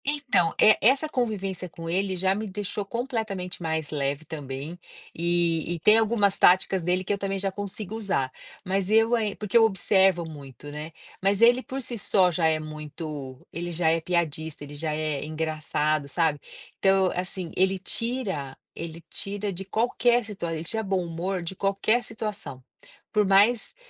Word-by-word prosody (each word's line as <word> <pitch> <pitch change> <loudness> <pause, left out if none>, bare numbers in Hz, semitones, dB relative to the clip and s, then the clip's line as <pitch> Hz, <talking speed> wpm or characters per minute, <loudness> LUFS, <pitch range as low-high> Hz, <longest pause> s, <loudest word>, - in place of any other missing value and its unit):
Então, 275 - +1
é, 215 - +6
essa 265 +7 +4
convivência 195 - -2
com 165 0 -9
ele 190 +2 0
já 190 +1 +2
me 215 +2 -3
deixou 205 +1 -4
completamente 220 -6 -4
mais 160 -2 -2
leve 145 +1 -1
também, 145 +2 -6 0.3
e 170 0 +1
tem 215 +1 +7
algumas 210 -3 +2
táticas 185 +1 +5
dele 180 +2 0
que 195 - -1
eu 200 - -3
também 195 0 -2
já 195 0 -1
consigo 205 +1 -4
usar, 195 -12 -1 0.3
mas 190 0 0
eu 225 +1 +4 0.3
porque 210 +1 -5
eu 230 - +8
observo 190 -4 +3
muito, 145 -3 -10
né, 150 +2 -6 0.3
mas 195 +1 +2
ele 240 +2 +6
por 265 +1 -5
si 235 -1 -1
só 185 -2 +4
já 165 -1 +2
é 160 -1 +2
muito, 150 -3 -7
ele 175 +1 -4
já 165 -1 +1
é 165 0 +1
piadista, 160 -3 -2
ele 145 0 -9
já 155 +2 -3
é 155 -2 -2
engraçado, 155 -1 -1
sabe, 160 -1 +1 0.4
então 195 -1 +4
assim, 180 -1 -4
ele 190 +1 +2
tira 190 - -3 0.2
ele 165 0 -7
tira 200 +1 -4
de 190 +2 -5
qualquer 240 +3 +2
situa 195 -5 -4
ele 160 0 -4
tira 220 +6 -1
bom 190 -4 -1
humor 175 +2 -3
de 170 +3 -5
qualquer 200 +5 +1
situação, 210 - -6 0.5
por 210 -1 +3
mais 205 - +4
185 Hz, 165 wpm, -26 LUFS, 160-205 Hz, 0.5 s, eu